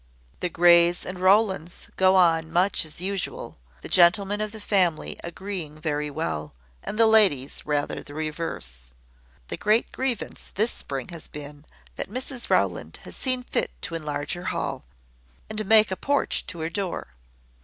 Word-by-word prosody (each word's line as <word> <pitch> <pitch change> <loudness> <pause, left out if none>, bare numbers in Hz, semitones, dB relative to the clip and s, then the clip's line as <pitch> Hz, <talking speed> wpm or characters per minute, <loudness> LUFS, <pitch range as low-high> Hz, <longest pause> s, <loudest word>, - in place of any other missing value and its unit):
"The 180 - -1
Greys 170 0 +5
and 185 0 -6
Rowlands 190 -3 +2
go 190 0 +4
on 165 -3 +4
much 180 +1 +2
as 155 +2 -7
usual, 195 - -4 0.2
the - - -7
gentlemen 195 +4 +4
of 215 -1 -2
the 220 - -9
family 185 -6 +1
agreeing 170 -4 -6
very 150 -1 -1
well, 140 - -4 0.3
and - - -5
the 225 - +6
ladies 195 -15 +3
rather 145 -1 -1
the 145 - -11
reverse. 155 - -4 0.7
The - - -3
great 215 +3 +2
grievance 260 -5 -4
this 220 +4 +2
spring 135 +1 -5
has 170 -2 -9
been, 145 0 -10 0.3
that - - -4
Mrs 255 +2 -4
Rowland - - +1
has - - -9
seen 255 -1 0
fit - - -1
to - - -4
enlarge 150 -2 -3
her 175 0 -7
hall, 185 - -3 0.7
and 215 0 -2
make 220 -1 +6
a - - 0
porch 285 +8 0
to 170 -5 -6
her 160 - -1
door. 185 - -3
175 Hz, 160 wpm, -25 LUFS, 155-205 Hz, 0.7 s, the